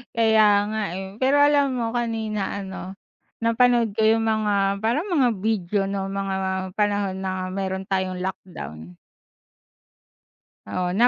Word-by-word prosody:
Kaya 220 Hz, -1 st, +5 dB, 0.3 s
nga, 220 Hz, -, -1 dB, 0.2 s
eh, 190 Hz, 0 st, -6 dB
pero 270 Hz, +2 st, +4 dB
alam 285 Hz, -1 st, +4 dB
mo 230 Hz, -1 st, -2 dB
kanina 220 Hz, -4 st, -2 dB
ano 190 Hz, -1 st, -7 dB, 0.4 s
napanood 230 Hz, -1 st, +3 dB
ko 220 Hz, -, 0 dB
yung 225 Hz, +1 st, +3 dB
mga 200 Hz, -3 st, +1 dB
parang 245 Hz, -, +1 dB
mga 290 Hz, -10 st, +3 dB
video, 205 Hz, -2 st, 0 dB
'no, 195 Hz, -1 st, -3 dB
mga 195 Hz, -1 st, -2 dB, 0.4 s
panahon 205 Hz, -2 st, 0 dB
na 185 Hz, -1 st, -3 dB
meron 190 Hz, 0 st, -3 dB
tayong 190 Hz, -1 st, -1 dB
lockdown. 90 Hz, -, -7 dB, 1.7 s
Oo, 180 Hz, -1 st, -2 dB
na 230 Hz, +7 st, +5 dB
205 Hz, 130 wpm, -24 LUFS, 190-230 Hz, 1.7 s, Kaya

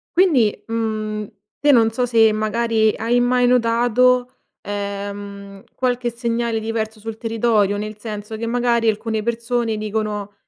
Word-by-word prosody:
Quindi, 295 Hz, -, +3 dB
mhmm, 215 Hz, -2 st, -2 dB, 0.3 s
te 290 Hz, -, +4 dB
non 225 Hz, -4 st, +4 dB
so 245 Hz, +2 st, 0 dB
se 225 Hz, -2 st, +5 dB
magari 220 Hz, 0 st, +1 dB
hai 235 Hz, +3 st, +1 dB
mai 245 Hz, 0 st, +3 dB
notato, 245 Hz, +1 st, +3 dB, 0.3 s
ehm, 200 Hz, -1 st, -6 dB
qualche 245 Hz, -1 st, 0 dB
segnale 235 Hz, -1 st, -2 dB
diverso 220 Hz, 0 st, -3 dB
sul 220 Hz, +1 st, -7 dB
territorio, 225 Hz, -3 st, +1 dB
nel 215 Hz, +1 st, -5 dB
senso 210 Hz, 0 st, -6 dB
che 225 Hz, +1 st, -4 dB
magari 235 Hz, -1 st, +2 dB
alcune 220 Hz, +1 st, -2 dB
persone 235 Hz, 0 st, -1 dB
dicono: 210 Hz, -1 st, -3 dB
225 Hz, 130 wpm, -20 LUFS, 215-240 Hz, 0.3 s, se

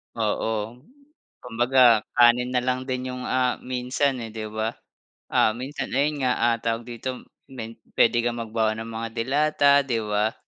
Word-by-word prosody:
Oo. 110 Hz, +1 st, -2 dB, 0.6 s
Kumbaga 120 Hz, -1 st, +4 dB
kanin 120 Hz, +1 st, +5 dB
na 125 Hz, -, +2 dB
lang 130 Hz, +1 st, -1 dB
din 130 Hz, 0 st, -3 dB
yung, 125 Hz, 0 st, -6 dB
ah, 125 Hz, -1 st, +1 dB
minsan 130 Hz, +2 st, -1 dB
eh 115 Hz, -, -6 dB
'di 110 Hz, -1 st, -5 dB
ba. 110 Hz, +1 st, -2 dB, 0.6 s
Ah, 110 Hz, -, +3 dB
minsan 130 Hz, +5 st, -5 dB
ayun 145 Hz, +1 st, 0 dB
nga, 125 Hz, -1 st, +3 dB
ah, 115 Hz, 0 st, +2 dB
tawag 115 Hz, 0 st, -2 dB
dito 125 Hz, +2 st, -6 dB, 0.3 s
men 115 Hz, -3 st, -8 dB, 0.2 s
puwede 120 Hz, 0 st, +3 dB
kang 120 Hz, -1 st, -1 dB
magbaon 110 Hz, -1 st, -1 dB
ng 115 Hz, -, -7 dB
mga 115 Hz, 0 st, -4 dB
delata, 140 Hz, +5 st, +2 dB, 0.2 s
'di 120 Hz, -4 st, -1 dB
ba. 105 Hz, +1 st, 0 dB
120 Hz, 160 wpm, -24 LUFS, 115-130 Hz, 0.6 s, kanin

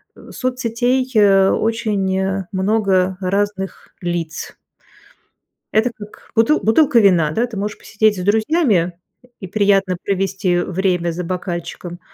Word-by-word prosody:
у -, -, -14 dB
соцсетей, 255 Hz, 0 st, -1 dB
э, 195 Hz, -2 st, +5 dB
очень 195 Hz, -4 st, 0 dB
много 190 Hz, -2 st, +1 dB
разных 195 Hz, +1 st, -2 dB
лиц. 170 Hz, -3 st, -4 dB, 1.2 s
Это 220 Hz, +3 st, +2 dB
как 210 Hz, 0 st, -13 dB
бутыл 230 Hz, +7 st, +3 dB
бутылка 255 Hz, +3 st, +4 dB
вина, 175 Hz, -7 st, +4 dB
да. 230 Hz, +9 st, 0 dB
Ты 230 Hz, -3 st, -8 dB
можешь 205 Hz, +2 st, -3 dB
посидеть 215 Hz, -1 st, 0 dB
с 180 Hz, -, -4 dB
друзьями 210 Hz, -, +1 dB, 0.4 s
и 190 Hz, -, -7 dB
приятно 195 Hz, -2 st, +2 dB
провести 195 Hz, -1 st, 0 dB
время 180 Hz, -1 st, -1 dB
за 175 Hz, +2 st, -4 dB
бокальчиком, 175 Hz, -1 st, -5 dB
195 Hz, 120 wpm, -19 LUFS, 185-220 Hz, 1.2 s, э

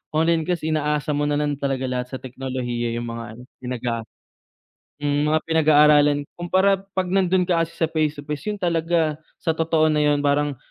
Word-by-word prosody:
online 165 Hz, +1 st, +3 dB
kasi 170 Hz, -3 st, -1 dB
inaasa 150 Hz, 0 st, 0 dB
mo 145 Hz, 0 st, 0 dB
na 145 Hz, -, +1 dB
lang 150 Hz, -1 st, 0 dB
talaga 135 Hz, -2 st, -1 dB
lahat 125 Hz, -1 st, -2 dB
sa 130 Hz, -, -5 dB
teknolohiya 125 Hz, -2 st, -4 dB
'yung 120 Hz, -, -4 dB
mga 115 Hz, 0 st, -5 dB
ano 120 Hz, -, -12 dB, 0.2 s
pinag 125 Hz, -1 st, -5 dB
ah, 115 Hz, -1 st, -1 dB, 1.0 s
mga 145 Hz, +2 st, +1 dB
pinag-aaralan. 150 Hz, -2 st, +4 dB
Kumpara 190 Hz, +3 st, +2 dB, 0.2 s
'pag 185 Hz, -1 st, +1 dB
nandun 185 Hz, -1 st, +3 dB
ka 175 Hz, -2 st, +2 dB
kasi 165 Hz, -, -13 dB
sa 160 Hz, -, +2 dB
face 155 Hz, -2 st, 0 dB
to -, -, -14 dB
face, 150 Hz, -2 st, -4 dB
'yun 210 Hz, -, -3 dB
talaga 165 Hz, -3 st, +1 dB, 0.2 s
sa 165 Hz, -, 0 dB
totoo 160 Hz, -1 st, +2 dB
na 150 Hz, -, +1 dB
'yun, 145 Hz, -1 st, +2 dB
parang 145 Hz, -1 st, +1 dB
150 Hz, 185 wpm, -22 LUFS, 135-165 Hz, 1.0 s, pinag-aaralan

